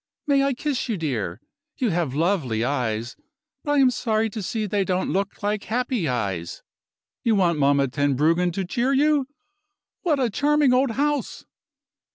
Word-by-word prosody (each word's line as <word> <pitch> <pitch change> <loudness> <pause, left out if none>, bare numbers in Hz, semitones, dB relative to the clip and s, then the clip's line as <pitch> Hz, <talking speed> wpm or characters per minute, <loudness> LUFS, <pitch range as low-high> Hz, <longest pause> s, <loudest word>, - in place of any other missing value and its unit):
May 280 -2 +3
I 275 -1 +1
kiss 270 -2 -2
you, 220 - 0
dear? 120 - -3 0.4
You 250 -7 0
have 165 -6 -1
lovely 150 - 0
eyes; 120 -3 -2 0.5
but 290 - 0
I - - +2
am 265 -2 +5
sorry 220 -2 0
to 215 - -5
see 215 +3 -2
that 210 - -5
they 205 -1 +2
don't 185 0 -1
look 195 +2 -2
like 205 0 -1
happy 245 -5 -1
eyes. 100 -9 -3 0.6
You 225 -2 +3
want 175 -5 +2
Mamma 140 0 +3
Tenbruggen 150 +6 +1
to 190 +1 -2
cheer 245 +8 0
you. 290 -1 +3 0.7
What 310 -6 +1
a 245 -4 +1
charming 290 +2 +3
old 260 +1 +3
house!" 285 +2 -1
200 Hz, 170 wpm, -24 LUFS, -, 0.7 s, am